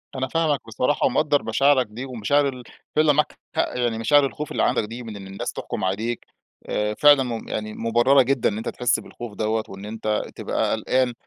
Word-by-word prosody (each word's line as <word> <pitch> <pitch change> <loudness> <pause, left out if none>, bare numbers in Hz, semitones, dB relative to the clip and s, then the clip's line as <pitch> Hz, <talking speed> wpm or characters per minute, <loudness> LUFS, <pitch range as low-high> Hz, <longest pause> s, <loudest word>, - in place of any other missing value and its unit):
أنا 130 0 -1
فاهمك 155 -2 +1
بصراحة 125 +6 0
ومقدّر 145 +2 +2
مشاعرك 140 -2 +3
دي 115 +5 -7
ومشاعر 135 +3 +1
ال 125 -2 -8 0.3
فعلًا 155 -1 +5
معاك 150 +1 0 0.2
حق، - - 0
يعني 120 -2 0
مشاعر 145 +5 +4
الخوف 150 +2 -5
اللي - - 0
عندك - - +2
دي 115 +3 -7
من 110 -2 -7
إن 95 -1 -9
الناس 95 0 -5
تحكم - - -5
عليك، 110 +5 -2 0.4
آآ، 105 0 0
فعلًا 145 +2 +6
م 115 -3 -5
يعني 110 0 -4
مُبررة 120 +5 +4
جدًا 130 -1 +2
إن 105 - -4
أنت 110 +2 -3
تحس 120 -1 +1
بالخوف 120 -3 -9
دوّة 110 0 0
وإن 95 +1 -9
أنت 110 0 -2
تبقى - - -1
قلقان، 130 -1 +1
120 Hz, 195 wpm, -23 LUFS, 110-140 Hz, 0.4 s, فعلًا